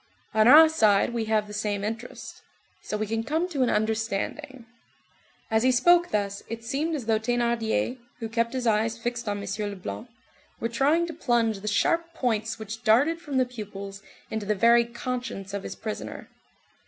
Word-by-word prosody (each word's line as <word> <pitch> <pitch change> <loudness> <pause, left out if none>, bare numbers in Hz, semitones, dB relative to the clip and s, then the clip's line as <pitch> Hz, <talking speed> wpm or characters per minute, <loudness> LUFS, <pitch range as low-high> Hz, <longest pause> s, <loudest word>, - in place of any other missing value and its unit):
On 215 +1 +4
our 310 +5 +10
side 220 -8 +3
we 230 -2 -1
have 215 -1 +1
the 210 - -10
same 205 -1 -2
interest. 225 +3 -6 0.4
So 215 - -4
we 215 - -1
can 225 +1 -2
come 320 +7 0
to 290 -6 -2
an 250 - +3
understanding." 220 +5 -2 0.9
As 220 0 +3
he 255 +2 +4
spoke 345 +8 +4
thus, 200 -1 -1
it 230 +1 -6
seemed 295 +7 -1
as 265 -6 -5
though 220 -1 +2
Thénardier, 235 +1 0 0.2
who 230 - -4
kept 230 +1 -1
his 255 -2 -2
eyes 225 0 +1
fixed 235 -1 -3
on 205 - -1
M. 200 - -6
Leblanc, 205 +2 -5 0.5
were 230 - -2
trying 295 +8 +2
to 335 - -6
plunge 235 -8 +1
the 210 - -8
sharp 330 +10 +1
points 225 -3 -1
which 220 +2 -7
darted 280 +10 +3
from 290 -5 -3
the 255 - +4
pupils 200 -4 -8 0.3
into 220 -2 -3
the 210 - +1
very 235 +3 +5
conscience 235 -4 -5
of 200 - -2
his - - -7
prisoner. 215 -1 -6
230 Hz, 180 wpm, -26 LUFS, 215-255 Hz, 0.9 s, our